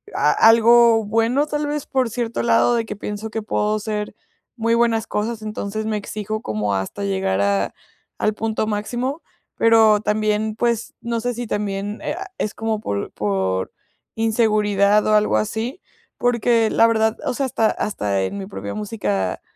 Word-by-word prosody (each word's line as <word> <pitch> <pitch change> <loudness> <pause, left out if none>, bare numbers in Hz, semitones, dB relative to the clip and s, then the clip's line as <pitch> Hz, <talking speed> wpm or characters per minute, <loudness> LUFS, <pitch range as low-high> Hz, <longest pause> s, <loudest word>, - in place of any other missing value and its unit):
a - - +3
algo 230 0 +6
bueno, 230 +7 +1
tal 295 0 -2
vez, 295 -1 -3
por 260 -3 0
cierto 235 0 -2
lado, 235 +1 +3
de 230 -1 0
que - - -6
pienso 210 +2 -5
que 225 0 -4
puedo 210 0 0
hacer 210 -1 -4 0.4
muy 230 0 0
buenas 230 -1 +2
cosas, 220 +1 -2
entonces, 215 0 -4
me 215 -1 -1
exijo 215 +1 -4
como 105 - -2
hasta 95 - -3
llegar 190 - 0
a 100 -1 +1 0.4
al 215 - +1
punto 220 0 -2
máximo. 240 +8 -2 0.4
Pero 225 -2 +5
también, 215 0 0
pues, 235 -1 -1
no 235 -1 -2
sé 245 +2 -2
si 240 +1 -5
también 205 0 -3
eh, - - -2
ah, 385 +1 -6
es 210 - -2
como 220 -1 -2
por 100 - -3
por 95 -2 -1 0.4
inseguridad 210 -2 +2
o 215 - +3
algo 210 - +3
así, 225 - -3 0.4
porque, 235 -2 +2
la 230 - +4
verdad, 220 -1 +1
o - - 0
sea, 275 +2 -1
hasta 225 -3 +1
hasta 100 - -1
en 150 - -3
mi 195 - -5
propia 195 - -6
música 195 - -2
215 Hz, 170 wpm, -21 LUFS, 205-230 Hz, 0.4 s, algo